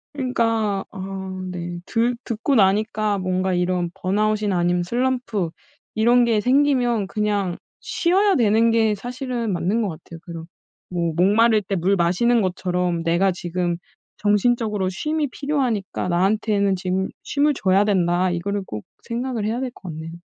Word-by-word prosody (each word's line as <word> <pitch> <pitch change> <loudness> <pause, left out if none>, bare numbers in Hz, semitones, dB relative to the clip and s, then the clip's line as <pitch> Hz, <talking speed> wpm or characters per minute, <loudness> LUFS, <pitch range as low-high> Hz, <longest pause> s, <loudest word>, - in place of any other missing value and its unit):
그니까 225 -6 0
아 190 -1 -6
네, 175 -1 -5
들 235 +1 +1
듣고 230 +5 -1
나니까 210 0 +2
뭔가 185 0 -1
이런 180 -1 0
번아웃이나 210 +1 0
아니면 175 0 +1
슬럼프 240 -3 -1 0.5
이런 240 +3 +4
게 230 -2 +2
생기면 250 -4 +2
그냥 205 -4 -1 0.2
쉬어야 385 +3 +2
되는 225 -1 +3
게 225 -2 +3
사실은 245 0 -4
맞는 195 +7 0
거 210 - -1
같아요 165 0 -10
그런. 165 -2 -8 0.4
뭐 170 -2 -1
목마를 215 +4 +4
때 195 +1 -2
물 190 +3 +2
마시는 195 +7 +2
것처럼 180 -2 -1
'내가 170 +3 +2
지금 175 0 -2 0.4
정신적으로 210 -1 +1
쉼이 305 - -1
필요하니까 255 -11 -2
나한테는 200 +2 +2
지금 185 +1 -1
쉼을 290 +1 +1
줘야 190 -1 +3
된다.' 185 -3 +2
이거를 200 +4 -2
꼭 105 -1 -6 0.2
생각을 235 -2 -3
해야 230 +3 -1
될 260 -2 -3
것 185 - -10
같네요. 160 +1 -7
205 Hz, 310 characters per minute, -22 LUFS, 180-235 Hz, 0.5 s, 이런